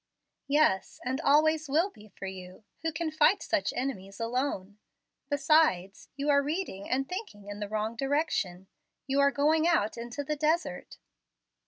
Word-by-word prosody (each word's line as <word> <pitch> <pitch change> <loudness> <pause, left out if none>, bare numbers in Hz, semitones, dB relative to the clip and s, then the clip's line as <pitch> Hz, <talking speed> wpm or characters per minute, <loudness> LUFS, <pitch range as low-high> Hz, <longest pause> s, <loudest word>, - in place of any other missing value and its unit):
"' - - -56
"Yes, 280 -9 +2
and 260 +4 -1
always 310 +1 +3
will 330 +8 +2
be 215 0 -16
for 195 -1 -9
you. 185 +1 -8 0.2
Who 325 - -1
can 315 +1 -3
fight 310 +6 +4
such 315 -1 0
enemies 200 -7 -4
alone? 230 -4 -2 0.5
Besides, 285 - +2
you 280 +1 -3
are 280 0 +5
reading 295 - -4
and 270 +1 0
thinking 360 - -7
in 205 0 -7
the 205 -1 -4
wrong 215 +1 -2
direction. 270 - -1 0.4
You 275 +1 0
are 280 0 +6
going 310 +3 +2
out 235 -10 +1
into 240 +5 -5
the 300 +2 -2
desert." 305 - -1
275 Hz, 160 wpm, -29 LUFS, 205-310 Hz, 0.5 s, are